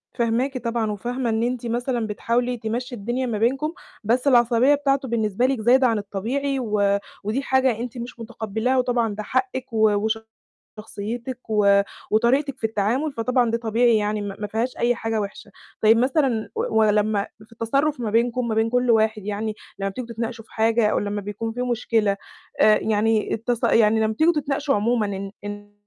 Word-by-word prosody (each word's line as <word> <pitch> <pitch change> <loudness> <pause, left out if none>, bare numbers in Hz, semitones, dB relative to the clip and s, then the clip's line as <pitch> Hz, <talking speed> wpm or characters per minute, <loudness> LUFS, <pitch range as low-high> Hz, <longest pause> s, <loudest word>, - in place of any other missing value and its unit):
فاهماكِ 245 +3 0
طبعًا 230 -3 -1
وفاهمة 240 +4 -3
إن 220 +1 0
أنتِ 245 0 -2
مثلًا 240 -1 -1
بتحاولي 240 +3 -1
تمشّي 240 +3 -4
الدنيا 240 +5 -2
ما 230 -4 -2
بينكم، 270 +8 0 0.3
بس 250 +6 +1
العصبية 245 +2 +5
بتاعته 275 -2 0
بالنسبة 225 0 0
لِك 260 -4 0
زايدة 255 +3 +5
عن 225 - +1
الطبيعي 245 +8 -2
و 205 -4 +1 0.3
ودي 220 +6 -1
حاجة 265 -4 +1
أنتِ 245 +1 -5
مش 240 0 -7
متقبلاها 225 +2 -2
وطبعًا 240 -4 +1
ده 215 - -5
حقِك 255 0 -2
و 215 -1 +3 0.7
وشخصيّتِك 230 +4 -6
و 200 -2 +4 0.3
وطريقتِك 265 +5 +2
في - - -11
التعامل، 225 +8 0
فطبعًا 245 0 +1
ده 230 - 0
طبيعي 230 0 +3
يعني 210 0 0
ما 200 -1 -5
ما 210 - -3
فيهاش 225 +5 -2
أي 240 +1 +2
حاجة 225 -2 -2
وحشة. 205 +1 -7 0.3
طيب 220 +1 +5
مثلًا 255 -3 +1
و 220 - 0
ولمّا 210 -1 +2 0.2
في 230 - -29
التصرف 275 +6 0
ما 225 -3 -2
بينكم 235 +2 +1
ما 220 - 0
بين 225 +1 +1
كلّ 245 0 +2
واحد 220 -2 +2
يعني 210 +1 -2 0.2
لمّا 195 0 -1
بتيجوا 240 +4 -7
تتناقشوا 230 0 -5
في - - -24
حاجة 225 0 +2
أو - - +1
لمّا 205 0 -2
بيكون 210 +3 -5
في 245 +2 -3
مشكلة، 225 -4 +1 0.4
آآ 215 0 +6
يعني 220 0 +1
التص 235 +1 -2
يعني 220 0 +4
لمّا 220 0 +1
بتيجوا 315 +9 +3
تتناقشوا 285 -1 -1
عمومًا 205 -3 0
الن 205 0 -7
230 Hz, 175 wpm, -23 LUFS, 215-250 Hz, 0.7 s, آآ